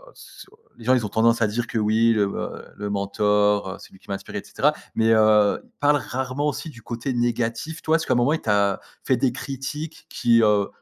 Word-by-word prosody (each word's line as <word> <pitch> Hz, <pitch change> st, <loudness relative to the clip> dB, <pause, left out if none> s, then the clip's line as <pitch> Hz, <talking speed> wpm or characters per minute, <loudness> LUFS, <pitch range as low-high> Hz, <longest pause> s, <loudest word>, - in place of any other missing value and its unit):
sur 445 Hz, -, -15 dB, 0.2 s
les 115 Hz, -, -13 dB
gens, 130 Hz, +1 st, +5 dB
ils 120 Hz, -, 0 dB
ont 105 Hz, -, -4 dB
tendance 115 Hz, +2 st, +2 dB
à 110 Hz, -, +4 dB
dire 115 Hz, +3 st, -2 dB
que, -, -, -4 dB
oui, 110 Hz, +2 st, +3 dB
heu 105 Hz, -, +4 dB
heu, -, -, -5 dB
le 105 Hz, 0 st, -5 dB
mentor, 105 Hz, 0 st, +1 dB
c'est -, -, -14 dB
lui 95 Hz, -, -17 dB
qui -, -, -24 dB
m'a 100 Hz, -, -1 dB
inspiré 100 Hz, -, -6 dB
et -, -, -11 dB
cetera -, -, +1 dB, 0.2 s
mais 115 Hz, 0 st, +3 dB
heu, 110 Hz, -2 st, +4 dB
ils -, -, -25 dB
parlent 145 Hz, 0 st, +4 dB
rarement 130 Hz, +3 st, -2 dB
aussi 150 Hz, +3 st, -3 dB
du 115 Hz, -3 st, -14 dB
côté 120 Hz, +3 st, -4 dB
négatif. 120 Hz, +6 st, -2 dB
Toi, 160 Hz, +1 st, +3 dB
est-ce -, -, -5 dB
qu'à -, -, +3 dB
un -, -, +2 dB
moment, 120 Hz, +5 st, +3 dB
il 160 Hz, -, -2 dB
t'a 100 Hz, -2 st, +1 dB, 0.2 s
fait 130 Hz, -, +2 dB
des 130 Hz, 0 st, +1 dB
critiques 140 Hz, +4 st, -6 dB
qui, 115 Hz, -1 st, +3 dB
heu, 105 Hz, -2 st, +3 dB
115 Hz, 235 wpm, -23 LUFS, 105-130 Hz, 0.2 s, gens